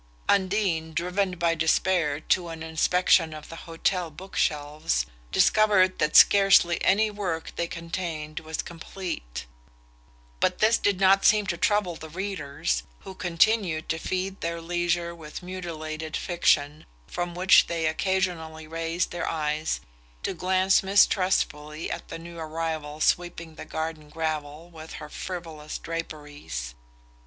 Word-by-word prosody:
Undine, 185 -5 +1
driven 180 +2 0
by 170 0 +2
despair 160 -1 +1
to 175 +2 +1
an 165 -1 -7
inspection 165 0 +2
of 150 - -10
the 165 - -8
hotel 175 +1 0
book 185 +5 -12
shelves, 150 +1 0 0.3
discovered 200 -4 +4
that 150 - +1
scarcely 195 -4 +6
any 215 +3 +3
work 180 -6 -4
they 170 - -1
contained 165 -3 -5
was 160 0 -4
complete; 165 - -6 0.9
but - - +2
this 225 +2 +4
did 200 -2 +1
not 195 0 +5
seem 210 -1 +5
to 180 - -1
trouble 185 0 +1
the 160 0 -9
readers, 150 - -2 0.2
who 190 - -9
continued 175 -1 +1
to 160 - -1
feed 185 +3 -3
their 170 0 -2
leisure 175 0 -1
with 160 +1 -9
mutilated 160 -4 -5
fiction, 150 -4 +1 0.2
from 175 - -4
which 185 +1 +6
they 165 -1 -1
occasionally 160 -2 -1
raised 165 +2 -2
their 175 - -2
eyes 155 0 -1 0.4
to - - -1
glance 185 +2 +3
mistrustfully 185 -6 +2
at - - -5
the 165 - -6
new 170 0 -10
arrival 155 -2 -4
sweeping 170 0 0
the - - -9
garden 160 -1 -5
gravel 155 0 -4
with 160 -1 -10
her 150 - -8
frivolous 160 -4 -6
draperies. 150 - -6
165 Hz, 135 wpm, -26 LUFS, 155-185 Hz, 0.9 s, scarcely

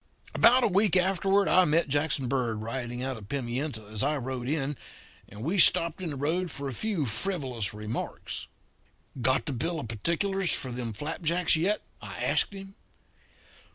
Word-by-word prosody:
"About 250 +2 +5
a - - +5
week 195 -1 +4
afterward 195 +2 +2
I 185 - +6
met 160 +2 +2
Jackson 145 -1 0
Bird 120 -4 -1
riding 120 +1 -4
out 130 -2 -3
of 100 -2 -12
Pimienta 125 -3 -3
as 105 0 -3
I 150 +2 +1
rode 130 -1 -4
in, 145 -1 -1 0.5
and 105 +2 -9
we 180 +8 0
stopped 170 +1 +5
on 175 - -3
the 145 - -4
road 165 +6 0
for 140 -1 -5
a 135 - -4
few 195 - -1
frivolous 125 - -2
remarks. 105 +2 -5 0.7
"'Got 130 +2 +2
the 145 - -2
bill 160 +7 -2
of 140 - -6
particulars 175 - 0
for 130 - -1
them 120 -1 -4
flapjacks 160 - 0
yet?' 185 +7 +1 0.2
I - - -7
asked - - +2
him. 195 0 -9
145 Hz, 170 wpm, -28 LUFS, 120-180 Hz, 0.7 s, I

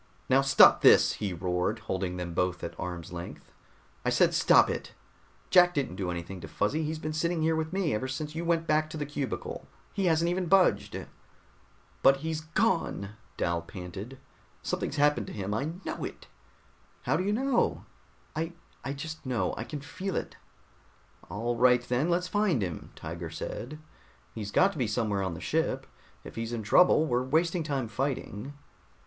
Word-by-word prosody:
"Now 135 +1 +5
stop 135 0 +7
this!" - - +7
he 100 -2 -3
roared, 90 +4 -1
holding 95 -3 -3
them 90 -1 -4
both 90 0 -1
at 85 - -4
arm's 90 -1 -5
length. 85 0 -8 0.5
"I - - +1
said - - +3
stop - - +6
it! - - -4 0.6
Jack 180 -1 +6
didn't 135 -10 -1
do 95 -2 -3
anything 85 +2 -5
to - - -7
Fuzzy, 140 +10 0
he's 155 +1 -2
been 155 0 -4
sitting 165 +1 0
here 160 0 +2
with 160 0 -2
me 185 -5 0
ever 110 +5 -1
since 150 +3 -4
you 165 +2 -3
went 165 -1 +1
back 155 0 +2
to 155 - -6
the 150 - -2
cubicle. 145 -2 -4 0.3
He 195 - -1
hasn't 165 0 +3
even 180 0 -1
budged." 130 - +3 1.0
"But 135 0 +6
he's 160 +2 -3
gone," 165 - 0 0.3
Dal 85 0 0
panted. 95 +8 -8 0.5
"Something's - - -2
happened 145 0 +2
to - - -7
him. 100 -1 -3
I 140 +9 -2
know - - -4
it." - - -7 0.8
"How 130 - +1
do 175 - 0
you 200 - 0
know?" 255 +3 +1 0.5
"I 165 +2 -2 0.3
I 135 - -3
just 155 +3 -7
know. 115 -9 -1
I - - -4
can 145 +4 -6
feel 190 +6 -5
it." - - -3 0.9
"All 120 +3 -2
right, 125 0 +4
then 130 +7 +1
let's 175 +1 +1
find 200 - +1
him," 85 -4 -5
Tiger 85 +1 -6
said. 120 - -6 0.6
"He's 105 -3 -5
got 190 - +4
to 160 - -8
be 125 - +1
somewhere 105 -2 0
on 95 -3 -2
the - - -7
ship. - - 0 0.4
If - - -11
he's 115 +1 -3
in 115 -2 -3
trouble, 155 - +5
we're 125 -4 +1
wasting 165 +6 +1
time 140 -6 -2
fighting." 130 0 -3
135 Hz, 180 wpm, -29 LUFS, 100-160 Hz, 1.0 s, stop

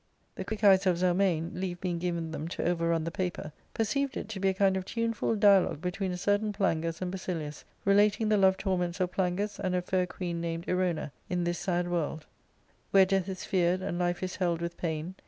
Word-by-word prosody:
'' - - -41
The - - -4
quick 220 -1 -5
eyes 195 -1 +6
of 180 -2 +3
Zelmane, 175 -2 +1
leave 180 -1 -4
being 175 -2 -2
given 170 -2 -2
them 160 0 -4
to 170 - -4
over 170 -1 +1
run 165 -1 +1
the 165 - -3
paper, 175 -4 -3 0.2
perceived 275 +5 0
it - - -5
to 210 -3 -5
be 195 - +1
a - - +1
kind 195 0 +3
of 190 - -1
tuneful 230 +2 -1
dialogue 200 -7 +4
between 185 +2 -2
a 180 - -3
certain 205 +3 +1
Plangus 165 -4 -1
and 180 - -3
Basilius, 165 -6 -5 0.2
relating 205 +2 +4
the 215 - +4
love 190 -1 +4
torments 180 -2 -1
of 180 -1 0
Plangus 190 +2 -1
and 185 -1 -1
a 180 - +1
fair 185 0 0
queen 175 -2 -4
named 165 0 -3
Erona, 180 -5 0 0.2
in 180 -1 0
this 175 0 -1
sad 175 -1 0
world, 165 -3 -1
*■*• - - -21 0.7
Where 195 -1 +6
death 195 0 0
is 185 -1 -5
fear'd 185 -1 +1
and 175 -2 -2
life 175 +1 0
is 185 - -4
held 175 -3 0
with 170 0 -4
pain. 160 +1 -3
180 Hz, 225 wpm, -29 LUFS, 170-195 Hz, 0.7 s, eyes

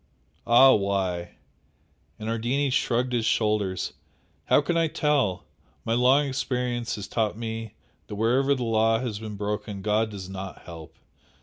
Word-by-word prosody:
"Ah, 130 +3 +7
why!" 95 -4 -1 0.8
and 110 - -7
Ardini 120 +5 0
shrugged 125 -1 0
his 120 -2 +1
shoulders 105 -4 0 0.5
"How - - +5
can 160 +4 -1
I 165 -1 +3
tell? 145 - 0 0.4
My 115 - 0
long 130 +4 +4
experience 125 -3 -2
has 100 -2 -7
taught 110 -1 -1
me 115 -1 -5 0.3
that 105 - -6
wherever 130 +6 +2
the 125 - -3
law 115 -1 +2
has 115 -4 -4
been 110 -1 -7
broken 105 -1 -4
God 110 +2 +1
does 100 -3 -8
NOT 95 0 -8
help! 80 -2 -11
115 Hz, 145 wpm, -26 LUFS, 105-125 Hz, 0.8 s, Ah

